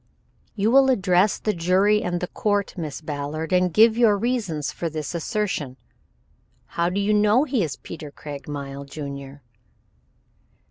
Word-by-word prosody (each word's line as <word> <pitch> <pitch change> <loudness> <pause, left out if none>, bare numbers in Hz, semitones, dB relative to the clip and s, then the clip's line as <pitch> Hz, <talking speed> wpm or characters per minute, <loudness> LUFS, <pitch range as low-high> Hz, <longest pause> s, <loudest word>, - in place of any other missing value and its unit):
"You 215 +1 +1
will 270 +1 +6
address 195 -4 +3
the 215 - -1
jury 190 +5 +3
and 175 -1 -2
the 180 - -2
court, 205 0 -1
Miss 160 -5 -5
Ballard, 150 +2 -4
and 180 0 +3
give 220 +4 +5
your 225 -3 +4
reasons 200 - -1
for 170 - -4
this 155 -2 -5
assertion. 170 -6 -2 0.9
How 170 0 0
do 190 +3 -2
you 205 +1 +1
know 210 +5 +4
he 265 -6 0
is 155 -6 -2
Peter 155 -3 -9
Craigmile, 140 -1 -7
Jr.?" 140 -1 -8
180 Hz, 145 wpm, -23 LUFS, 150-210 Hz, 0.9 s, will